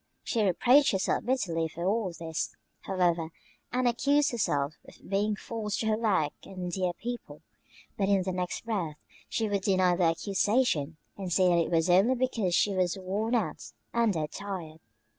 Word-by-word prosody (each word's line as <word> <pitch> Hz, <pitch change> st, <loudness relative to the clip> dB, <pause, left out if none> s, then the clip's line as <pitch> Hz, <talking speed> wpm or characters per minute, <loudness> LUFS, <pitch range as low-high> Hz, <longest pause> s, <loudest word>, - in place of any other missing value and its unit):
She 230 Hz, -, 0 dB
reproached 245 Hz, -, +4 dB
herself 190 Hz, -, 0 dB
bitterly 175 Hz, -11 st, 0 dB
for 170 Hz, +2 st, -6 dB
all 200 Hz, -1 st, +1 dB
this, 165 Hz, -1 st, -4 dB, 0.2 s
however, 175 Hz, -4 st, 0 dB, 0.4 s
and 250 Hz, 0 st, +1 dB
accused 280 Hz, +5 st, +2 dB
herself 145 Hz, -, 0 dB
of -, -, -13 dB
being 205 Hz, +2 st, +1 dB
false 210 Hz, -1 st, -4 dB
to -, -, -2 dB
her 215 Hz, -, +3 dB
work 190 Hz, -10 st, +1 dB
and 190 Hz, -, -12 dB
her 180 Hz, -, -2 dB
dear 180 Hz, -1 st, -1 dB
people; 240 Hz, +6 st, -7 dB, 0.6 s
but 195 Hz, -1 st, +2 dB
in 195 Hz, -2 st, +3 dB
the 185 Hz, -, -2 dB
next 180 Hz, +4 st, -3 dB
breath 185 Hz, -9 st, -2 dB, 0.3 s
she 225 Hz, -, 0 dB
would 200 Hz, -1 st, 0 dB
deny 185 Hz, -3 st, +3 dB
the 175 Hz, 0 st, +2 dB
accusation 190 Hz, -, +1 dB, 0.2 s
and 190 Hz, -3 st, -5 dB
say 185 Hz, +1 st, +4 dB
that 170 Hz, -1 st, +4 dB
it -, -, -5 dB
was 165 Hz, -1 st, +2 dB
only 195 Hz, +8 st, +5 dB
because 230 Hz, -8 st, 0 dB
she 205 Hz, -, +3 dB
was 185 Hz, -1 st, 0 dB
worn 205 Hz, +5 st, -1 dB
out 235 Hz, -, -2 dB, 0.2 s
and 235 Hz, -3 st, +3 dB
"dead 155 Hz, -2 st, -2 dB
tired." 175 Hz, -6 st, -6 dB
190 Hz, 180 wpm, -29 LUFS, 175-225 Hz, 0.6 s, only